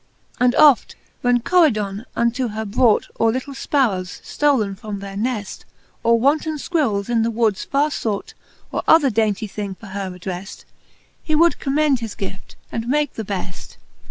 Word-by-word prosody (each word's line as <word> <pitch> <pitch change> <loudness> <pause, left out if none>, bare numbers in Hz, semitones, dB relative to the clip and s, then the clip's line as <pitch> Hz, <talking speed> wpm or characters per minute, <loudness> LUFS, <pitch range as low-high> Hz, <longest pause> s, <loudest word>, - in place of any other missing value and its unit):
And 250 0 +3
oft, 290 -5 +5 0.3
when 245 -1 +2
Coridon 225 - +2
unto 235 +2 +1
her 220 0 -4
brought 220 +1 +2
Or 225 0 +4
litle 260 +4 -4
fparrowes, 215 -11 -1
ftolen 255 -10 +1
from 210 0 -6
their 195 0 -8
nefl, 215 -1 -3 0.4
Or 230 0 +3
wanton 300 +5 +1
fquirrels, 270 - 0
in 235 -1 +1
the 225 - +1
woods 220 -3 0
farre 290 +2 +1
fought, 215 -7 -3 0.4
Or - - -1
other 295 -5 +6
daintie 215 -1 0
thing 200 -1 -5
for 220 - -14
her 195 -1 -3
addreft. 180 +1 -7 0.6
He 310 - -1
would 335 +2 +4
commend 285 -1 +2
his 225 -3 -6
guift, 190 -1 -7 0.2
and 230 0 -3
make 295 +1 +1
the 220 - -5
beft. 190 -2 -6
230 Hz, 160 wpm, -21 LUFS, 200-275 Hz, 0.6 s, other